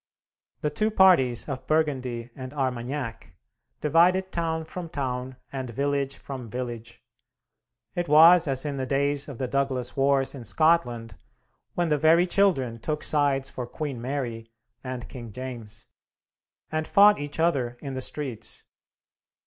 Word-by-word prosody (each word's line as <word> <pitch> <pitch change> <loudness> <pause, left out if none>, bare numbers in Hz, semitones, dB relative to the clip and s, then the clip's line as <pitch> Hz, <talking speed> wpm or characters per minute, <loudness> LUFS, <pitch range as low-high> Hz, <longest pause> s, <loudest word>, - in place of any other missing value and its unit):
The 150 - 0
two 215 +8 +1
parties 175 - +4
of 130 -2 -5
Burgundy 130 -6 -1
and 130 0 -8
Armagnac 125 -5 -3 0.5
divided 180 +5 +3
town 160 -1 -2
from 170 +1 -7
town 130 -3 -3 0.2
and 130 -2 -4
village 140 +3 -1
from 130 -4 -8
village. 120 -1 -6 0.9
It 175 0 -2
was 165 +3 +7
as 135 0 +1
in 145 -2 -3
the 130 -1 -3
days 140 +1 0
of 140 -5 -8
the 130 - -2
Douglas 130 -2 -1
Wars 135 -1 +2
in 135 -4 -8
Scotland, 120 -7 +1 0.6
when 175 -1 0
the 150 -1 +2
very 165 +3 +5
children 170 -12 +1
took 150 +5 -3
sides 140 -3 +1
for 125 -2 -5
Queen 140 -3 -5
Mary 120 -4 -4 0.3
and 125 -2 -5
King 120 -3 -9
James, 120 -2 -7 0.9
and 155 0 -2
fought 205 +1 +6
each 145 +1 -6
other 135 -8 +1
in 140 -2 -6
the 130 - -4
streets. 125 -6 -5
135 Hz, 140 wpm, -26 LUFS, 125-155 Hz, 0.9 s, was